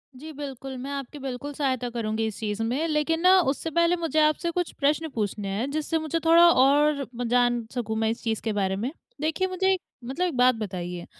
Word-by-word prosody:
जी 310 +5 -9
बिल्कुल, 270 -2 -7
मैं 270 +3 -6
आपकी 280 +1 -6
बिल्कुल 270 +2 -5
सहायता 260 -4 -1
करूँगी 225 -2 -2
इस 210 - -6
चीज़ 210 -1 -3
में। 265 +8 -1
लेकिन 310 +1 0
ना, 370 +1 +6
उससे 315 0 -1
पहले 340 +2 +3
मुझे 325 -2 -1
आपसे 310 +3 +2
कुछ 355 0 -2
प्रश्न 300 +3 +1
पूछने 205 -2 -2
हैं 255 +5 -2
जिससे 310 +2 -1
मुझे 315 +1 -2
थोड़ा 335 +1 +7
और 285 0 +4 0.2
जान 240 -1 +2
सकूँ 225 -3 -3
मैं 220 0 +1
इस 230 - -4
चीज़ 220 -2 -1
के 220 -2 -2
बारे 190 -2 0
में। 230 +8 -3 0.3
देखिए, 320 +5 0
मुझे 380 +1 +1
एक 370 - -3 0.2
मतलब 270 +9 -2
एक 315 - -4
बात 250 -1 +5
बताइए 180 -4 -5
275 Hz, 210 wpm, -26 LUFS, 230-315 Hz, 0.3 s, थोड़ा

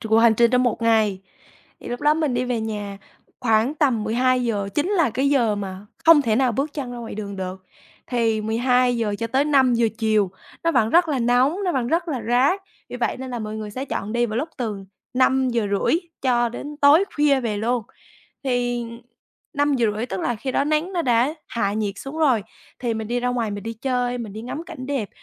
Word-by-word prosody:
chục 220 - -7
cuộc 220 - +5
hành 230 -1 +5
trình 235 +1 +4
trong 250 0 +3
một 240 -2 0
ngày. 220 -4 +2 0.6
Thì - - -9
lúc 245 - -4
đó 295 +1 +4
mình 305 -5 0
đi 245 +1 0
về 245 -2 -1
nhà 205 -2 -4 0.4
khoảng 225 +3 +2
tầm 260 -8 +1
12:00, 235 -3 +1
chính 300 +6 0
là 335 - +2
cái 270 +5 +1
giờ 240 -7 +3
mà 195 0 -6 0.2
không 325 -3 +8
thể 225 -4 +1
nào 255 -1 +2
bước 275 +6 -2
chân 265 -5 -5
ra 245 - -6
ngoài 230 -1 -7
đường 200 -1 -6
được, 190 0 -6 0.4
thì 230 -3 +1
12:00 235 0 +1
cho 230 - -2
tới 265 +5 +1
5:00 255 -5 +3
chiều 215 -4 +2 0.3
nó 335 - +2
vẫn 225 -5 +2
rất 345 +3 +4
là 285 -3 0
nóng, 245 +6 +3
nó 360 - +1
vẫn 255 -3 0
rất 335 +6 0
là 265 -7 -2
rát 265 +11 +3 0.3
vì - - -6
vậy 245 - -1
nên 260 0 -7
là 245 - -3
mọi 215 0 -5
người 215 -1 -5
sẽ 255 +6 -5
chọn 215 -5 -4
đi 240 0 +2
vào 215 - -4
lúc 310 - -2
từ 210 -5 -4 0.3
5:30 250 -3 +2 0.3
cho 240 -2 +2
đến 290 +5 -7
tối 290 +5 +6
khuya 290 -2 +3
về 225 -4 -2
luôn, 235 +3 0 0.6
thì 245 -2 0 0.7
5:30 245 -6 +1
tức 190 -5 -4
là 240 - 0
khi 260 +4 -4
đó 275 - +2
nắng 310 +5 0
nó 350 -2 0
đã 245 +2 +2
hạ 200 -4 -1
nhiệt 210 -2 -2
xuống 275 +4 -7
rồi, 260 -9 +3 0.4
thì 240 -2 -1
mình 220 -1 -4
đi 245 +1 -1
ra 250 - 0
ngoài 240 -3 -1
mình 205 0 -5
đi 230 - -3
chơi, 245 +1 -1
mình 225 -4 -6
đi 215 +2 -7
ngắm 285 +7 -5
cảnh 255 -5 -8
đẹp. 265 -7 -2
245 Hz, 220 wpm, -22 LUFS, 220-270 Hz, 0.7 s, không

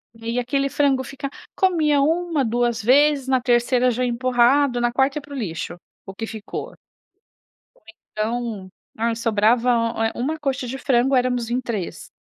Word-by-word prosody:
E 225 0 -14
aí, 230 +2 -1
aquele 275 +3 0
frango 275 -2 +1
fica 275 +2 -6 0.3
comia 315 -6 +2
1, 325 -1 +1
2 235 -1 0
vezes, 275 +3 +4
na 260 -1 +2
terceira 245 +1 +2
já 245 +2 -1
empurrado, 250 +2 +2
na 240 - +1
quarta 270 +3 +1
ia - - -3
pro 285 0 -10
lixo, 175 -8 -4 0.3
o 195 - -8
que 225 +3 -5
ficou. 220 -2 -6
Ou - - -18 1.4
então, 215 -3 -3 0.3
ah, 230 +1 0
sobrava, 230 +2 +2 0.4
eh, - - -2
uma 300 +6 -2
coxa 275 -3 -2
de 260 +3 -5
frango, 265 0 +2
éramos 250 -2 0
em 245 +1 0
3. 215 -8 -5
250 Hz, 160 wpm, -22 LUFS, 230-275 Hz, 1.4 s, vezes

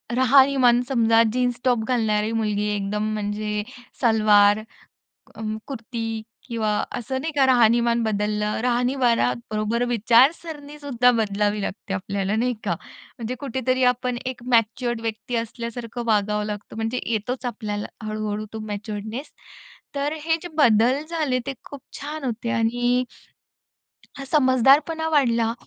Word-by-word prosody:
राहणीमान 260 -1 +5
समजा 230 -3 +4
जीन्स-टॉप 245 -1 +1
घालणारी 220 -3 +1
मुलगी 210 -2 0
एकदम 210 +2 -2
म्हणजे 210 0 -2 0.4
सलवार 215 -3 +5 0.8
अं, 215 -1 -4
कुर्ती 225 -3 -5 0.2
किंवा 225 -3 -1 0.3
असं 260 +2 -3
नाही 320 +3 -3
का 275 - +5
राहणीमान 235 -1 +4
बदललं. 210 -1 -1
राहणीमानाबरोबर 235 - +1
विचारसरणीसुद्धा 280 +2 +2
बदलावी 210 -2 0
लागते 195 0 -4
आपल्याला 195 +2 -2
नाही 245 +2 +1
का? 180 -4 0 0.4
म्हणजे 235 +2 -4
कुठेतरी 260 -1 0
आपण 250 0 -3
एक 255 -1 -5
मॅच्युअर्ड 235 +1 +1
व्यक्ती 225 +2 -4
असल्यासारखं 235 +1 -5
वागावं 210 -1 +1
लागतं 210 0 -7
म्हणजे 225 +3 -2
येतोच 240 +3 -2
आपल्याला 210 -3 -4 0.2
हळू-हळू 215 0 -3
तो 220 - -5
मॅच्युअर्डनेस. 215 +5 -5 0.6
तर 285 +1 -1
हे 320 +1 +2
जे 350 - -6
बदल 245 0 +4
झाले 310 -6 0
ते 275 - -2
खूप 285 -2 -10 0.2
छान 295 0 -6
होते 235 -1 -3
आणि 245 +3 +1 1.1
हा 275 - -6
समजदारपणा 280 +4 +3
वाढला 235 -7 +2
235 Hz, 120 wpm, -23 LUFS, 215-255 Hz, 1.1 s, राहणीमान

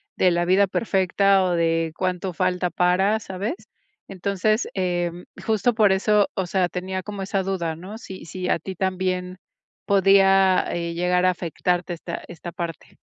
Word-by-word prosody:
de 180 -1 +3
la 175 0 +1
vida 190 +3 +4
perfecta, 195 -1 +2
o 180 - 0
de 165 -1 +1
cuánto 185 0 -2
falta 180 0 0
para, 185 +5 +2
¿sabes? 195 +5 -4 0.6
Entonces, 200 +3 0
em 175 -2 -2 0.2
justo 220 +2 +2
por 210 -3 +4
eso, 205 +1 +3
o 190 - -2
sea, 180 0 +1
tenía 185 +1 -4
como 205 +1 -6
esa 195 0 -1
duda, 175 -4 -2
¿no? 190 +6 -9
Si 190 -5 -10
si 185 +2 -5
a - - +2
ti 190 - -7
también 185 0 -2 0.5
podía, 195 -1 +4
eh, 170 -1 -3
llegar 180 +1 +1
a - - +5
afectarte 180 0 -1
esta 170 0 -6
esta 175 0 -8
parte. 170 -2 -7
185 Hz, 160 wpm, -23 LUFS, 175-195 Hz, 0.6 s, a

